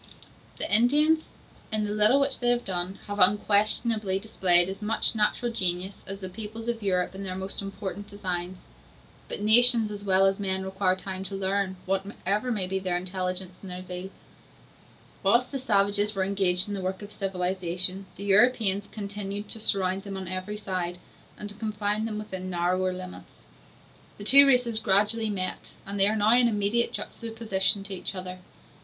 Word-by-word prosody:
] - - -28
The - - 0
Indians, 300 +7 +3 0.4
in 215 -1 0
the 205 - -3
little 210 +6 +4
which 275 -1 +1
they 245 - 0
have 245 0 +1
done, 180 +1 -3
have 205 0 -5
unquestionably 210 +1 +3
displayed 180 -4 +2
as 195 +2 -7
much 220 +3 +2
natural 225 +2 0
genius 185 -2 -1
as 195 +1 -4
the 190 -1 -7
peoples 220 +4 -8
of 235 -1 -2
Europe 185 -3 0
in 195 - -8
their 185 -2 -5
most 190 +1 -5
important 200 0 -6
designs; 185 -2 -4 0.7
but - - -4
nations 225 0 +5
as 205 -1 -7
well 190 -1 +4
as 195 +1 +1
men 190 -1 0
require 190 -1 0
time 190 0 -6
to 195 - -5
learn, 195 0 -1
whatever 200 +4 -2
may 205 -5 0
be 190 +1 -2
their 185 -2 -1
intelligence 185 0 -4
and 195 - -9
their 180 0 -6
zeal. 180 +1 -7 1.1
Whilst 235 +6 +2
the 275 - -3
savages 205 -3 +1
were 190 - 0
engaged 190 -1 +2
in 205 - -4
the 195 - -4
work 190 +2 -4
of 205 - -10
civilization, 185 -1 0
the 200 - -9
Europeans 205 -1 +3
continued 205 0 -5
to 225 - -6
surround 195 -3 +1
them 195 -1 -7
on 190 -1 -6
every 185 +3 -4
side, 185 -3 -3 0.4
and 210 - -6
to 205 - -8
confine 210 0 -2
them 215 -2 -4
within 190 -3 -6
narrower 180 +1 0
limits; 185 0 -10 0.7
the 205 - -9
two 275 +6 +8
races 245 -4 +3
gradually 210 +3 +2
met, 185 -3 -4
and 200 +1 -4
they 195 - +5
are 215 - +1
now 215 +1 +3
in 245 -1 +5
immediate 215 +2 0
juxtaposition 220 -3 0
to 200 0 -6
each 190 +1 -5
other. 185 0 -7
200 Hz, 180 wpm, -26 LUFS, 185-215 Hz, 1.1 s, two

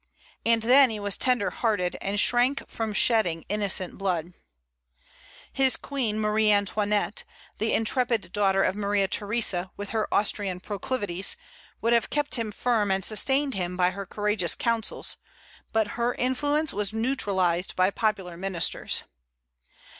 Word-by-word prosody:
And 230 -1 +2
then 260 +3 +6
he 220 -2 -5
was 205 -1 0
tender 250 -5 +1
hearted, 205 -6 -1
and 200 +1 -1
shrank 245 +5 +2
from 225 -1 -4
shedding 210 -7 +2
innocent 200 -3 -1
blood. 180 -3 -2 1.2
His 265 -1 +5
queen, 240 -7 -2
Marie 215 0 +2
Antoinette, 205 -1 0 0.4
the 220 +1 0
intrepid 225 -4 +1
daughter 195 -1 +2
of 190 - 0
Maria 200 -1 0
Theresa, 200 -3 0
with 205 0 -6
her 220 -1 -2
Austrian 200 -3 0
proclivities, 200 -2 -3 0.4
would 230 +1 +2
have 235 -1 +2
kept 295 -1 -2
him 230 -3 0
firm 215 -1 0
and 190 -1 +1
sustained 270 +5 +3
him 180 -2 -3
by 180 0 +3
her 200 +1 -7
courageous 210 -4 0
counsels; 230 -2 -1 0.5
but 220 -2 +1
her 235 +3 -1
influence 290 +4 0
was 205 0 -1
neutralized 195 -7 0
by 185 +1 +2
popular 195 -5 -2
ministers. 185 -1 0
210 Hz, 140 wpm, -26 LUFS, 195-235 Hz, 1.2 s, then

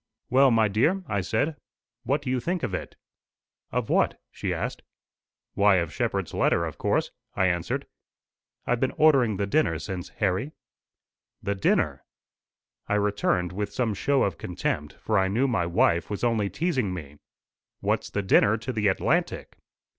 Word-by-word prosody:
"Well, 135 +1 +6
my 115 -2 +4
dear," 155 - +1
I 100 -8 -1
said, 145 - -1 0.4
"what 140 +2 -1
do 130 - -2
you 130 - +1
think 175 +6 -2
of 115 -6 -2
it?" 95 - -5 0.8
"Of - - -1
what?" - - +2
she - - -3
asked. - - -3 0.7
"Why, 100 0 +4
of 85 -4 0
Shepherd's - - -2
letter, 85 - +2
of 80 - -7
course," - - 0 0.2
I 95 - +2
answered. 85 -2 -1 0.8
"I've 120 - +1
been 130 - 0
ordering 135 -9 +4
the 100 - 0
dinner 100 - +1
since, 90 +1 -6
Harry." 105 +10 -1 0.9
"The 100 - 0
dinner!" 95 - +1 0.9
I 105 - +2
returned 100 -3 +1
with 100 +2 -3
some 120 -4 0
show 140 +7 +1
of 95 -4 -2
contempt, 75 -4 -3
for 105 -2 0
I 95 - +2
knew 115 +8 +1
my 90 -10 0
wife 85 -1 +2
was 105 +1 -4
only 110 -4 +1
teasing 135 - -1
me. 75 -4 -9 0.6
"What's - - -1
the 100 - -2
dinner 100 +3 +4
to 120 +4 -5
the 105 -2 +1
Atlantic?" 95 - 0
105 Hz, 160 wpm, -26 LUFS, 95-130 Hz, 0.9 s, Well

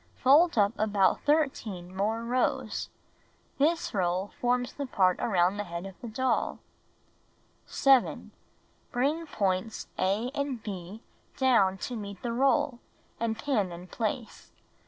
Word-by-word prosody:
Fold 295 +4 +5
up 205 0 +4
about 205 -3 +2
13 225 - 0
more 220 +4 -1
rows. 250 +2 -1 0.7
This 320 +4 +1
roll 185 0 0
forms 245 0 +1
the 280 -1 -4
part 185 -6 +2
around 185 -2 +2
the 205 - -2
head 170 +1 -6
of 195 - -7
the 240 - -6
doll. 255 +4 0 1.1
7. 270 -3 +3 0.6
Bring 295 +7 0
points 195 -4 -2
a 205 +7 +1
and 280 -3 -2
h 190 +2 -6 0.4
down 215 -8 +3
to 245 +5 -5
meet 200 -3 -7
the 235 -1 -2
roll, 270 0 +2 0.4
and 225 -1 -1
pin 220 -7 0
in 170 +1 -8
place. 220 +4 -4
225 Hz, 130 wpm, -29 LUFS, 195-260 Hz, 1.1 s, Fold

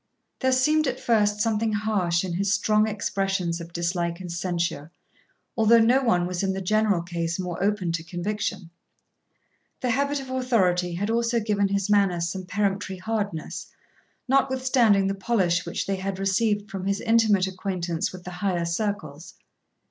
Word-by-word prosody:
There 260 -1 +2
seemed 305 +4 +3
at 255 0 -2
first 210 -3 +2
something 220 -1 +1
harsh 200 -5 0
in 185 -2 -3
his 195 +3 0
strong 215 +2 +3
expressions 195 -4 -1
of 170 0 -9
dislike 170 0 -2
and 180 -2 -7
censure, 170 -3 -2 0.7
although 225 0 +5
no 240 +4 +4
one 180 -9 +2
was 180 0 -3
in 195 -1 0
the 190 - -3
general 205 -2 +1
case 170 -1 -3
more 180 -2 -4
open 200 -4 0
to 165 -1 -3
conviction. 185 +1 -4 1.1
The 250 - 0
habit 280 +3 0
of 265 -1 -8
authority 185 -9 +1
had 205 +5 -1
also 235 0 +1
given 205 -2 +1
his 200 -1 -1
manners 190 -5 +2
some 185 0 -6
peremptory 195 0 -1
hardness, 205 -4 -4 0.6
notwithstanding 260 -6 +3
the 195 - 0
polish 190 -5 0
which 170 - -3
they 195 -1 -1
had 190 0 -3
received 205 +1 0
from 195 -1 -4
his 200 +1 0
intimate 225 -4 +3
acquaintance 180 -3 -3
with 185 -1 -10
the 180 - -7
higher 180 -2 -1
circles. 170 -4 -4
195 Hz, 160 wpm, -25 LUFS, 175-220 Hz, 1.1 s, although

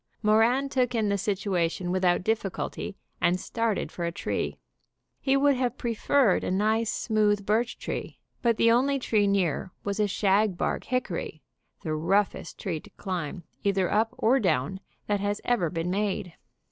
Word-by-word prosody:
Moran 225 +6 +4
took 250 -3 0
in 220 -2 +1
the 200 - +2
situation 185 -3 -1
without 180 -1 +2
difficulty, 200 -2 -2 0.2
and 175 +1 +3
started 230 +1 -1
for 175 - -5
a 170 - 0
tree. - - -3 0.6
He 270 0 +2
would 285 0 +4
have 250 -1 -1
preferred 235 -1 +2
a - - -1
nice, 215 +4 +1
smooth 210 -2 +1
birch 225 +3 +1
tree, - - -5 0.2
but 235 -3 +2
the 230 - +5
only 270 +4 +3
tree 215 -5 +2
near 185 -3 0
was 200 +1 -2
a 210 - +3
shag 200 -1 +2
bark - - -1
hickory, 185 -10 -3 0.4
the 155 - -2
roughest 190 +6 0
tree 170 -5 -3
to - - -16
climb, 180 -2 -4 0.2
either 195 -2 +1
up 225 +3 +1
or 255 +5 +3
down, 180 - 0 0.3
that 205 -1 0
has 205 +1 -1
ever 225 -9 +2
been 165 +2 -2
made. 195 -3 -1
205 Hz, 160 wpm, -27 LUFS, 185-230 Hz, 0.6 s, the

